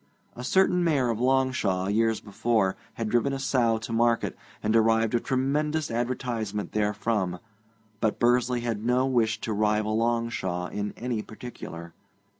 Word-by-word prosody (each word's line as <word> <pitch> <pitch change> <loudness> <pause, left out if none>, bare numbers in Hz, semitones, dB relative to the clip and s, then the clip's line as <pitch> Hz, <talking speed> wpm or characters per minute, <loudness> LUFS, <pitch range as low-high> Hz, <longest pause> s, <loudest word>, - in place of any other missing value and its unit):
A 125 - -7
certain 180 +3 +3
Mayor 140 -8 +2
of 115 - -3
Longshaw, 130 -8 +1
years 110 +2 +1
before, 105 -1 0 0.2
had 115 - -2
driven 120 +5 +1
a - - -1
sow 120 -4 +2
to 110 +1 -6
market, 115 0 +2 0.3
and 110 - +1
derived 115 0 +3
a 120 - +3
tremendous 150 +5 0
advertisement 115 -3 -2
therefrom, 105 -3 0 0.6
but 110 -1 0
Bursley 120 0 +2
had 115 -3 -3
no 125 +2 +2
wish 115 -4 +1
to 110 - -2
rival 105 +1 +1
Longshaw 115 -6 -1
in 105 0 -3
any 120 -2 -2
particular. 85 -8 -9
115 Hz, 145 wpm, -27 LUFS, 105-125 Hz, 0.6 s, certain